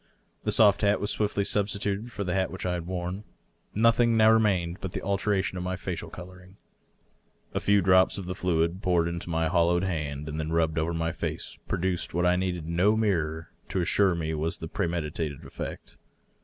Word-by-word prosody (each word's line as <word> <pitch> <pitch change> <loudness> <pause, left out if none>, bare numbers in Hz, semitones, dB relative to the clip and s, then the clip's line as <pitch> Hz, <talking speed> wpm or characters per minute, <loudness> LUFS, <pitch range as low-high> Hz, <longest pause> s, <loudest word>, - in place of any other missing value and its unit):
The - - +1
soft 105 -3 +5
hat 105 0 +3
was 105 - -1
swiftly 105 -1 0
substituted 100 +2 -1
for 100 - -4
the 90 -2 -2
hat 95 0 +1
which 95 - -6
I 90 - 0
had 85 -1 -4
worn. 90 +2 -4 0.5
Notliing 115 +1 +4
now 110 0 +6
remained 95 -6 +2
but 95 -2 -5
the - - -3
alteration 100 -1 0
in - - -4
my 90 +1 -2
facial 90 -2 -5
coloring. 90 +1 -12 1.0
A - - 0
few 100 -2 +3
drops 95 0 +4
of 100 - -5
the 90 - -3
fluid, 85 0 0
poured 90 -3 +2
into 85 0 -5
my 80 -1 +1
hol 85 0 +3
lowed 85 +1 +2
hand 75 -5 -3
and 75 +1 -4
then 80 0 -3
rubbed 80 -1 +1
over 85 +2 -1
my 80 0 -1
face, 80 - -5
produced 90 -2 -2
what 90 +1 +2
I 90 0 +4
needed 90 -3 -2
no 90 +6 +3
mirror 80 -7 -1 0.2
to - - -1
assure 95 +1 +3
me 80 -1 -2
was 80 +1 -1
just - - -14
the 80 - -4
premeditated 80 -5 -3
effect. - - -8
90 Hz, 200 wpm, -27 LUFS, 85-100 Hz, 1.0 s, now